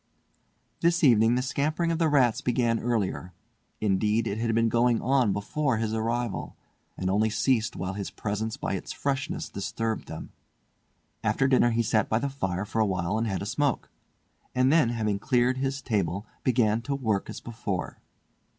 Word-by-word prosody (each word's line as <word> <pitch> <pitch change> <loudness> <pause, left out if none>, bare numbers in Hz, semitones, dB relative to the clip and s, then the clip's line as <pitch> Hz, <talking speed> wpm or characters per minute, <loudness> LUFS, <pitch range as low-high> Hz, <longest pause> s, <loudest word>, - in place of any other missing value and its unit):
This 170 0 +2
evening 115 -3 +5
the 125 - 0
scampering 155 +5 0
of 165 - -1
the 165 - +3
rats 130 -6 +3
began 120 -2 +1
earlier; 100 -6 -2 0.5
indeed 105 +2 +1
it 110 -1 -2
had 115 -1 0
been 115 0 +3
going 120 +1 +3
on 130 -4 +2
before 115 +6 -1
his 110 0 -1
arrival, 115 -1 -2 0.4
and 95 - -2
only 105 +4 +2
ceased 120 +1 +1
whilst 95 +2 -4
his 100 - -3
presence 110 +1 -3
by - - -3
its - - -4
freshness 135 -1 -2
disturbed 110 +3 -3
them. - - -8 0.9
After 135 - +2
dinner 130 -2 +4
he 115 0 +1
sat 110 0 +1
by 110 - +2
the 140 +4 -1
fire 95 -8 -2
for 105 +2 -3
a - - +4
while 95 +2 -1
and 115 - 0
had 95 -2 -2
a - - -4
smoke; 145 +6 -1 0.6
and 130 +1 +4
then, 155 -7 +4
having 110 -4 -1
cleared 125 +2 +2
his 135 +1 -2
table, 100 -3 -1 0.2
began 115 -3 +2
to 140 +3 -2
work 110 -7 -1
as - - -6
before. 110 -6 -4
115 Hz, 175 wpm, -27 LUFS, 105-130 Hz, 0.9 s, evening